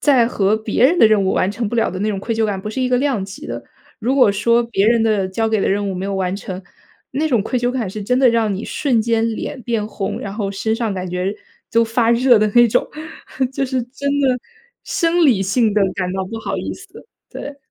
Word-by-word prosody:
在 260 -6 +4
和 210 -2 +1
别 220 +2 0
人 340 +6 +4
的 - - +8
任 215 -2 +3
务 190 - +1
完 185 - +1
成 225 0 -3
不 240 - -3
了 225 - +2
的 185 - -5
那 215 - 0
种 200 -2 -2
愧 230 +3 -3
疚 220 0 +1
感 195 -2 -3
不 210 - -6
是 260 - -4
一 255 - +1
个 250 - +2
量 265 -7 0
级 195 - -9
的。 - - -5 0.4
如 250 +5 0
果 230 -7 +5
说 235 +4 +2
别 220 -3 +1
人 230 -1 +3
的 205 -4 +1
交 225 +4 -1
给 220 -2 +1
的 - - +1
任 200 +1 0
务 190 - -4
没 185 +1 -4
有 200 - -2
完 185 0 -1
成， 190 -2 -6 0.5
那 300 +4 0
种 240 -8 +2
愧 250 +3 -1
疚 245 0 +1
感 250 -6 -2
是 210 +3 -6
真 250 +5 +1
的 265 - +5
让 230 -3 +2
你 200 - -5
瞬 260 -6 0
间 225 0 +1
脸 255 - -5
变 225 -3 -1
红， 200 -2 -4
然 200 0 -6
后 205 -3 -2
身 220 +3 -1
上 225 -3 -1
感 185 -1 -4
觉 180 +2 -2 0.4
都 230 0 +4
发 230 0 +1
热 245 0 +5
的 215 - +3
那 240 - +8
种。 - - +1 0.7
就 270 0 -1
是 255 -1 -1
真 275 +3 -5
的 260 -2 +2 0.5
生 335 0 +1
理 240 -9 +4
性 215 +2 +1
地 210 - +2
感 180 -1 -2
到 190 0 -2
不 225 +4 -6
好 - - -3
意 - - -4
思。 - - -14 0.2
对。 285 0 -7
225 Hz, 275 characters per minute, -19 LUFS, 200-245 Hz, 0.7 s, 的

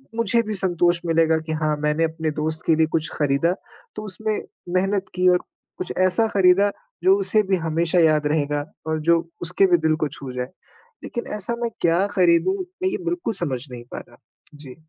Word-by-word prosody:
मुझे 230 0 +2
भी 215 0 -4
संतोष 175 -2 +2
मिलेगा 165 -1 +3
कि - - -3
हाँ, 155 -1 0
मैंने 150 +2 0
अपने 160 -1 -2
दोस्त 155 +1 -3
के 160 - +5
लिए 160 -1 +3
कुछ 160 -1 0
खरीदा, 145 +4 +1 0.4
तो 215 - -6
उसमें 215 +2 -2 0.4
मेहनत 195 +1 +1
की, 180 0 +2
और 180 0 +4 0.4
कुछ 185 - -4
ऐसा 185 +5 +3
खरीदा 195 +1 +4 0.3
जो 380 +1 +6
उसे 220 - +3
भी 190 0 +1
हमेशा 165 +1 0
याद 155 -2 +3
रहेगा 145 -1 0 0.2
और 160 0 0
जो 170 +1 +4 0.2
उसके 180 +3 +2
भी 175 -1 +4
दिल 160 -1 +1
को - - +2
छू 135 -2 -7
जाए। 125 0 -3 0.6
लेकिन 235 - -5
ऐसा 235 +4 -1
मैं 235 - 0
क्या 170 +3 +3
खरीदूँ, 185 - +3 0.3
मैं 375 - +3
ये - - -2
बिल्कुल 345 -9 -2
समझ 135 -9 -2
नहीं 120 -1 -8
पा - - -5
रहा। - - -19 0.4
जी। 140 -4 -11
170 Hz, 195 wpm, -22 LUFS, 155-195 Hz, 0.6 s, जो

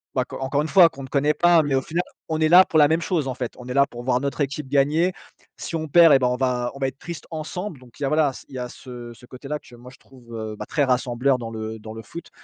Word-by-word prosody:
bah 130 - +1
core 135 - -7
encore 140 +2 0
une 155 - -2
fois 170 +2 +7
qu'on 135 -1 -10
ne - - -7
connaît 145 +2 +1
pas, 175 -1 +4
mais 145 -2 -2
au 135 - +2
final 170 +6 -2 0.3
on 160 0 -1
est 155 0 +3
là 180 +2 +8
pour 160 - 0
la 145 - +7
même 160 +2 +1
chose 160 -7 -1
en 130 - -2
fait, 125 -2 -5
on 125 0 -11
est 125 - -4
là 140 0 +4
pour 120 -2 -9
voir 125 -1 +1
notre 140 +1 -3
équipe 140 0 -2
gagner, 150 +6 +2 0.5
si - - -5
on 160 -1 -3
perd 165 0 +7
et 135 - +6
bien 125 - +2
on 125 - 0
va 125 -2 -1
on 140 - -10
va 135 - 0
être 135 +1 -8
triste 170 -3 -8
ensemble 160 +1 -5
donc 125 0 -18
il - - -4
y - - +2
a - - 0
voilà, 150 -2 +2 0.2
il - - -17
y - - -4
a 125 0 -4
ce 120 -2 -10
ce 125 - -16
côté 130 +3 -11
là 150 +1 -2
que 125 - -19
moi, 120 +1 -13
je - - -17
trouve, 120 -3 -14
heu, 110 -1 -5
bah - - -7
très 145 - +1
rassembleur 125 0 +1
dans 115 -1 -6
le 110 0 -6
dans 110 +1 -9
le 115 - -8
foot 170 +9 -10
135 Hz, 320 wpm, -23 LUFS, 125-155 Hz, 0.5 s, là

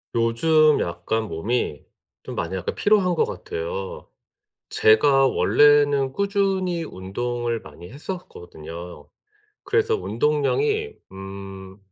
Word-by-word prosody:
요즘 150 +7 +3
약간 85 +6 -2
몸이 90 -3 -2 0.4
좀 - - -8
많이 85 +3 -3
약간 90 -1 -4
피로한 195 -4 +3
것 - - +2
같아요. 85 +4 -6 0.6
제가 135 +5 +4
원래는 145 -1 +4
꾸준히 195 -3 0
운동을 120 +2 -3
많이 80 +3 -13
했었거든요. 90 - -9 0.6
그래서 450 0 +1
운동량이 420 - 0 0.2
음 95 0 -9
120 Hz, 220 characters per minute, -23 LUFS, -, 0.6 s, 제가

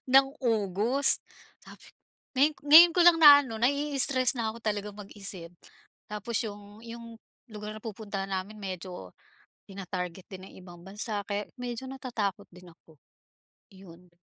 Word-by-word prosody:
ng 270 0 +8 0.2
August?" 225 +4 +1 0.4
Sabi - - -15 0.5
ngayon 295 +3 +4
ngayon 320 +4 +9
ko 360 - +4
lang 345 -1 +7
naano, 285 -6 +7
nai-stress 275 0 +1
na'ko 225 0 -4
talagang 210 -1 -3
mag-isip. 195 -4 -9 0.6
Tapos 210 +2 -6
’yong 205 0 -10
’yong 230 0 -10 0.4
lugar 210 0 -7
na 215 - -12
pupuntahan 200 -3 -6
namin 195 +3 -5
medyo 185 - -8 0.5
tina-target 185 -2 -6
din 185 -1 -9
ng - - -18
ibang 175 -1 -13
bansa 205 +2 -5
kaya 205 0 -3
medyo 245 +1 -6
natatakot 220 -7 -4
din 180 0 -16
ako. 160 -3 -24 0.7
Iyon. 180 -2 -16
210 Hz, 130 wpm, -28 LUFS, 195-245 Hz, 0.7 s, ngayon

